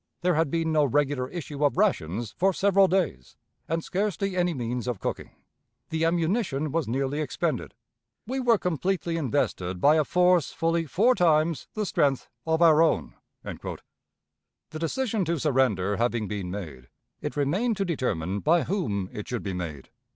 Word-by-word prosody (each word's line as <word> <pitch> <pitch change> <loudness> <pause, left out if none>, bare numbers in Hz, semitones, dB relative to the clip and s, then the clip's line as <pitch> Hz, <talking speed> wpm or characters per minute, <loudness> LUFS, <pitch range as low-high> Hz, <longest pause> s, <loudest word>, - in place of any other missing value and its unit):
There 180 0 +2
had 160 -1 +1
been 165 +1 0
no 155 -1 +3
regular 140 -1 +1
issue 150 -4 -5
of 145 +2 +2
rations 115 - 0
for 190 +2 +2
several 195 +1 +4
days, 175 - -1 0.3
and 165 +1 -1
scarcely 195 0 -1
any 180 -1 +2
means 125 -4 -3
of 120 -6 -2
cooking. - - -4 0.6
The 160 0 +1
ammunition 165 - 0
was 165 -1 -1
nearly 135 +5 -1
expended. 150 - -2 0.5
We 260 +4 -3
were 240 -3 +4
completely 180 0 -1
invested 110 - -1
by 150 - +5
a 155 - +4
force 180 -1 +3
fully 165 0 0
four 220 - +3
times 165 - +2
the 215 -1 -1
strength 140 -7 +1 0.2
of 160 +1 +3
our 160 -1 +6
own." 165 - +1 0.3
The 155 0 -11
decision 220 +5 -1
to 170 +1 0
surrender 125 -9 +1
having 120 -2 0
been 100 -3 -4
made, 80 -10 -7 0.3
it - - -4
remained 190 - +1
to 195 - 0
determine 100 - -1
by 165 - +3
whom 105 - -2
it 105 - -6
should 120 -2 -3
be 95 - -3
made. 80 -6 -6
155 Hz, 160 wpm, -26 LUFS, 125-180 Hz, 0.6 s, our